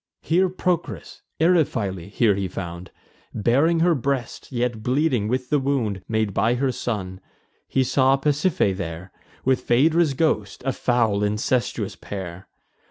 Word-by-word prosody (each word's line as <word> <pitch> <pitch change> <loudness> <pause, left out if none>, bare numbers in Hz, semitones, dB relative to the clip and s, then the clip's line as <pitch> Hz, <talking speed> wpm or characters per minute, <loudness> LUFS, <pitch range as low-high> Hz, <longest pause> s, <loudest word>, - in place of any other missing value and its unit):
Here 180 +4 +2
Procris, 175 - -3 0.2
Eriphyle 115 - +1
here 105 0 +3
he 100 -1 -2
found, 85 -1 -7 0.5
Baring 140 +10 +2
her 175 0 +4
breast, 135 -3 -3
yet 120 -3 -1
bleeding 125 -2 +1
with 125 +2 -2
the 150 - +4
wound 125 -8 -1
Made 110 -2 0
by 115 +5 +2
her 130 +1 0
son. 95 -7 -4 0.5
He 135 - +1
saw 130 +1 +3
Pasiphae 145 - +1
there, 90 0 -6 0.3
With 130 0 +2
Phaedra's 155 +4 +3
ghost, 105 -11 0
a 135 - +1
foul 115 -6 +1
incestuous 105 +3 -1
pair. 95 -2 -7
120 Hz, 135 wpm, -23 LUFS, 100-140 Hz, 0.5 s, her